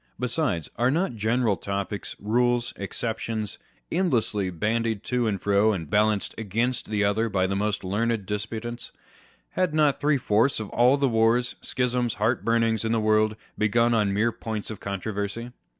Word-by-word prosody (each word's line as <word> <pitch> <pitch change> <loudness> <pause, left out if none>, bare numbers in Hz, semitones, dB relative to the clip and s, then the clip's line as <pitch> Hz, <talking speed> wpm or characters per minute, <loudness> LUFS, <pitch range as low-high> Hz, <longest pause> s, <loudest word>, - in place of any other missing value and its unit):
Besides, 125 - -1
are 120 +2 +3
not 165 +2 0
general 110 0 +1
topics, 100 +2 -4
rules, 120 +3 +1
exceptions, 110 +1 -3 0.3
endlessly 115 - +1
bandied 110 +4 -1
to 125 -2 0
and 100 -3 -1
fro, 100 +3 +3
and 80 -6 -5
balanced 105 -1 +2
one 115 - -5
against 115 +5 -1
the 105 -1 +1
other 110 +3 +1
by 95 -2 +1
the 95 +1 -1
most 105 +1 -1
learned 105 +2 -1
disputants? 110 +4 -5 0.6
Have 180 -4 0
not 150 -3 +3
three 145 0 +3
fourths 115 +2 +2
of 110 - -5
all 125 +4 +4
the 140 -1 +2
wars, 115 +1 +2
schisms, 125 -2 0
heartburnings 115 0 +1
in 115 0 0
the 115 - +2
world 110 0 +2 0.2
begun 115 +3 +3
on 105 -3 +2
mere 110 +4 +2
points 110 -2 -5
of 110 - -7
controversy 105 +4 -4
110 Hz, 160 wpm, -25 LUFS, 105-120 Hz, 0.6 s, all